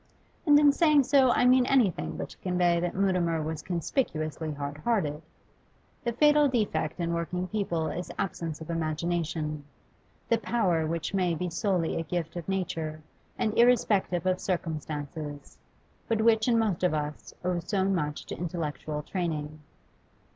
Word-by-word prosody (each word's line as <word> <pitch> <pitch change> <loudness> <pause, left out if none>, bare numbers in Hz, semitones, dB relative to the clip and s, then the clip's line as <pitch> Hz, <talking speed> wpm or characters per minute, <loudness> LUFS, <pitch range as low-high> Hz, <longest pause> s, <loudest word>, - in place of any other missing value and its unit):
And 290 -1 +8
in 295 -1 +6
saying 300 -1 +4
so 270 -1 +4
I 245 - +3
mean 250 0 +5
anything 245 -10 +2
but - - -4
to - - -14
convey 180 -2 +2
that 175 0 -2
Mutimer 180 -4 +1
was 155 0 -4
conspicuously 160 - -2
hard 145 0 -5
hearted. 155 -6 0 0.8
The 235 - 0
fatal 295 +4 +5
defect 195 - -1
in 170 0 -1
working 180 +2 -2
people 180 -6 -1
is 175 +1 -5
absence 165 -5 -3
of 160 - -6
imagination, 160 -2 -2 0.6
the 230 - +2
power 185 -10 +1
which 165 +3 -3
may 180 -3 +1
be 180 +2 -3
solely 175 -1 0
a - - -2
gift 165 -1 -3
of 175 +1 -6
nature 160 -5 -3 0.3
and 215 -1 0
irrespective 215 -7 +3
of 185 0 +1
circumstances, 150 -4 -4 0.5
but 225 -1 +1
which 220 0 +4
in 235 -2 +4
most 210 -6 0
of 180 -3 +3
us 150 0 -5
owes 175 -1 -2
so 195 -3 +1
much 155 -6 -1
to - - -6
intellectual 155 -3 -4
training. 155 -4 -3
175 Hz, 155 wpm, -28 LUFS, 155-210 Hz, 0.8 s, And